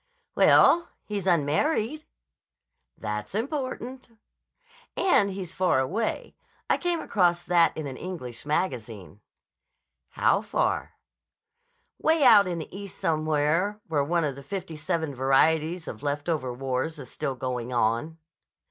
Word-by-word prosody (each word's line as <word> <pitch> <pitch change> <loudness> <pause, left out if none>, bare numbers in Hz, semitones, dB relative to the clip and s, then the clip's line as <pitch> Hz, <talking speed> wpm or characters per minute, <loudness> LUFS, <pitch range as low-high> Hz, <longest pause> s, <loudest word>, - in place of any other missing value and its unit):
"Well, 340 0 +5 0.2
he's 200 -3 -4
unmarried." 215 - +1 0.9
"That's 105 - -5
important." 255 0 -4 0.9
"And 205 - +3
he's 190 -2 -6
far 185 -5 +2
away. 195 +13 -2 0.3
I - - +2
came 350 -1 -1
across 175 -3 +1
that 175 -1 +3
in 155 - -4
an 135 -2 -6
English 145 -11 -7
magazine." 115 - -3 0.9
"How - - +3
far?" - - -1 1.1
"Way 320 -1 +3
out 215 -6 +7
in 175 -2 -2
the 165 +2 -7
East 200 -1 -8
somewhere 155 +5 0
where 145 -3 +1
one 170 +3 0
of 145 -3 -1
the 140 - -10
fifty 175 +3 -6
seven 160 -1 -2
varieties 155 +6 +2
of 110 - -7
left 145 +1 -2
over 145 -7 -1
wars 130 +5 -3
is 135 -4 -10
still 135 - -3
going 125 -1 -4
on." 120 +7 0
160 Hz, 130 wpm, -26 LUFS, 135-195 Hz, 1.1 s, out